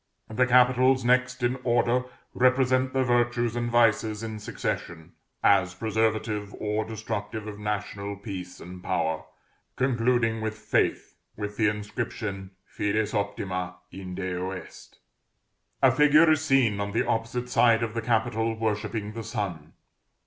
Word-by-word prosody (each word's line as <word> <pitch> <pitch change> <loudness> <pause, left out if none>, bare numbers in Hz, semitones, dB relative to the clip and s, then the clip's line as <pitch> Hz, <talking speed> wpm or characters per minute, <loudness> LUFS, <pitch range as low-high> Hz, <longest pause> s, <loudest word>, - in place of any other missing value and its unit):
The 125 +3 +2
capitals 125 +1 +4
next 130 0 +2
in 125 +2 +1
order 120 +1 +2 0.3
represent 130 0 +3
the 130 0 +1
virtues 120 -1 +1
and 120 0 -1
vices 115 -2 +2
in 110 -1 -5
succession, 85 -5 -5 0.3
as 95 -2 +4
preservative 110 0 -1
or 105 +1 -1
destructive 110 -1 -5
of 105 -1 -7
national 100 -1 -3
peace 95 -3 -7
and 90 +1 -10
power, 80 -1 -1 0.5
concluding 120 -3 +1
with 110 0 -3
Faith, 110 - 0 0.2
with 105 0 -4
the 110 - +3
inscription 105 -2 -4 0.2
"Fides 105 +1 -1
optima 90 -3 -2 0.2
in 95 0 -7
Deo 90 -1 -3
est." 95 - -10 0.9
A - - +7
figure 150 +2 +6
is 155 -1 +2
seen 130 -8 +3
on 100 0 -3
the 115 - +1
opposite 115 +2 -1
side 115 -2 +4
of 110 -2 -3
the 115 - -2
capital, 115 -1 0
worshipping 105 -1 -2
the 115 0 -6
sun. 95 -8 -4
110 Hz, 135 wpm, -26 LUFS, 100-120 Hz, 0.9 s, A